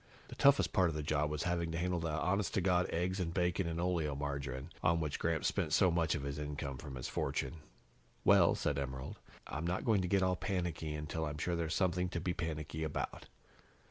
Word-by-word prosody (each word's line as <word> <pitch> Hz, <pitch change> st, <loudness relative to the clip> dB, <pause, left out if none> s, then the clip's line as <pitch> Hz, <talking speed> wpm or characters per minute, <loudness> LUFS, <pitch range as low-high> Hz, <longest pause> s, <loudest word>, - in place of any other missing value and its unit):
The -, -, -8 dB
toughest 140 Hz, 0 st, +5 dB
part 95 Hz, -4 st, +4 dB
of 80 Hz, -, -4 dB
the 75 Hz, -, -2 dB
job 75 Hz, 0 st, +1 dB
was 75 Hz, 0 st, -2 dB
having 85 Hz, -2 st, 0 dB
to -, -, -1 dB
handle 90 Hz, 0 st, 0 dB
the 80 Hz, 0 st, -2 dB
honest 95 Hz, +6 st, 0 dB
to 95 Hz, -, +3 dB
God 90 Hz, -1 st, +2 dB
eggs 90 Hz, +3 st, -1 dB
and 85 Hz, -3 st, -1 dB
bacon 90 Hz, 0 st, +1 dB
and 85 Hz, 0 st, -2 dB
oleomargarine, 70 Hz, -5 st, -2 dB
on 85 Hz, 0 st, +3 dB
which 75 Hz, -3 st, -2 dB
Gramps 85 Hz, -1 st, +1 dB
spent -, -, -1 dB
so 95 Hz, -, +5 dB
much 85 Hz, -1 st, +2 dB
of 70 Hz, -, -3 dB
the 70 Hz, +1 st, -3 dB
income 70 Hz, -2 st, -4 dB
from 70 Hz, -4 st, -7 dB
his 60 Hz, -, -4 dB
fortune. 85 Hz, -, -2 dB, 0.7 s
"Well," -, -, +6 dB
said 70 Hz, -1 st, 0 dB
Emerald, 65 Hz, 0 st, -5 dB, 0.3 s
"I'm 80 Hz, +4 st, -3 dB
not 90 Hz, +2 st, -1 dB
going 110 Hz, -4 st, +4 dB
to 90 Hz, -, -1 dB
get 95 Hz, +1 st, +3 dB
all 90 Hz, 0 st, +2 dB
panicky 90 Hz, -5 st, -2 dB
until 75 Hz, +2 st, -3 dB
I'm 75 Hz, -1 st, -3 dB
sure 85 Hz, +3 st, -1 dB
there's 80 Hz, -1 st, -1 dB
something 90 Hz, -1 st, +1 dB
to 85 Hz, -, -2 dB
be 90 Hz, +1 st, -1 dB
panicky 80 Hz, -2 st, -3 dB
about." 80 Hz, -2 st, -3 dB
80 Hz, 215 wpm, -35 LUFS, 75-90 Hz, 0.7 s, Well